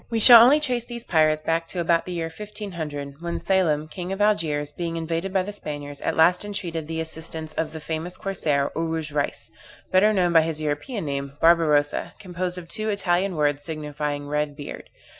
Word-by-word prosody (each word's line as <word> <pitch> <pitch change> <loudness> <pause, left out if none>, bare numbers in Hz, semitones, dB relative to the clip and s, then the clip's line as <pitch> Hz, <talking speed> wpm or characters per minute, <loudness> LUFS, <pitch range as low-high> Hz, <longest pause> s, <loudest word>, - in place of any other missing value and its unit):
_] - - -28
We 230 -1 0
shall 235 +1 +10
only 275 +5 +6
trace 250 -5 -1
these 240 -1 -7
pirates 155 -5 +2
back 165 0 0
to 180 - -5
about 170 0 +1
the - - -4
year 165 -2 -3
1500, 160 -9 -6
when 170 0 -3
Selim, 170 -5 +1
king 180 +3 -6
of 195 - -3
Algiers, 160 -8 +1
being 165 +1 -4
invaded 165 +3 -2
by 190 -1 +1
the 205 +2 -6
Spaniards, 145 -6 -6
at - - -1
last 175 +4 +4
entreated 170 -6 -4
the 160 0 -3
assistance 160 -1 -5
of 160 0 -2
the 160 - -7
famous 160 +3 -5
corsair, 150 -8 -1
Oruj 160 -2 -2
Reis, 145 -1 -2 0.4
better 190 +3 +5
known 180 -4 +2
by 165 - +7
his 160 -1 -2
European 155 - -3
name, 140 -1 -3
Barbarossa, 155 -3 +3
composed 180 -1 -4
of 175 -2 -8
two 215 +5 -3
Italian 190 -2 0
words, 145 -2 +1
signifying 150 -2 -4
red 150 0 -1
beard. 145 - -8
165 Hz, 195 wpm, -24 LUFS, 150-185 Hz, 0.4 s, shall